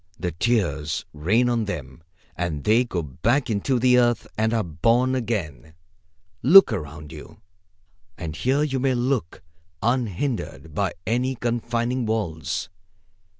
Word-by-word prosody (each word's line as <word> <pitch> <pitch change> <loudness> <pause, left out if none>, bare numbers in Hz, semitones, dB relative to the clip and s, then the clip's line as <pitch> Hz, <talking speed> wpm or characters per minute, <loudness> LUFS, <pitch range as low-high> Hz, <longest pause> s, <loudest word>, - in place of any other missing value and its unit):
The 90 -1 -2
tears 80 -6 0
rain 100 +12 +2
on 120 -2 +1
them, 75 -8 -6 0.3
and 80 -4 -3
they 115 +3 +4
go 90 -8 -3
back 120 - 0
into 110 +5 0
the 125 +1 +4
earth 120 -2 +2
and 110 +1 +1
are 115 -2 +1
born 115 - +1
again. 80 - -3 0.7
Look 170 - +8
around 75 -5 -6
you, - - -11 0.8
as 80 -2 -6
here 135 +4 +1
you 135 -3 -1
may 130 0 +1
look, 120 -7 -1 0.4
unhindered 115 - -2
by 95 +3 -1
any 125 +3 0
confining 120 +1 -1
walls. 80 -10 -2
110 Hz, 130 wpm, -24 LUFS, 80-125 Hz, 0.8 s, Look